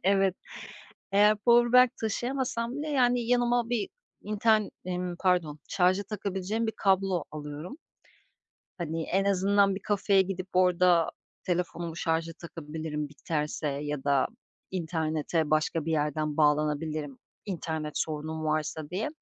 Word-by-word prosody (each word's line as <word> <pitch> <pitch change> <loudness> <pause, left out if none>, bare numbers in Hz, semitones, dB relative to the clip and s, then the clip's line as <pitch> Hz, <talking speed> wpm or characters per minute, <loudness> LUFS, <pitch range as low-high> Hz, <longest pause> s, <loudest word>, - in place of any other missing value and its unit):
Evet, 195 -1 +3 0.8
eğer 210 +2 +5
powerbank 240 +2 +5
taşıyamasam 240 +1 -2
bile, 300 +1 -3
yani, 245 -4 +3
yanıma 240 0 +2
bir 235 -4 -1 0.3
inter 215 +1 +3 0.3
ımm, 180 -1 -3
pardon 175 -5 +1
şarja 185 +1 +2
takabileceğim 200 +2 -3
bir 220 - -1
kablo 195 -2 +2
alıyorum. 150 - -7 1.0
Hani, 165 -2 -3
en 195 +4 0
azından 200 0 +3
bir - - -5
kafeye 200 -1 +3
gidip 185 -1 -4
orada 180 -2 +4 0.3
telefonumu 175 -2 -2
şarja 165 0 -1
takabilirim 155 -3 -6
biterse 150 +1 -3
ya 145 0 -3
da 140 -2 +3 0.4
internete 160 -2 -1
başka 155 0 +1
bir 165 - -1
yerden 150 0 -1
bağlanabilirim, 150 -1 +1 0.3
internet 160 -5 -3
sorunum 155 0 -3
varsa 155 0 -1
diye. 190 +6 -2
180 Hz, 120 wpm, -28 LUFS, 155-205 Hz, 1.0 s, eğer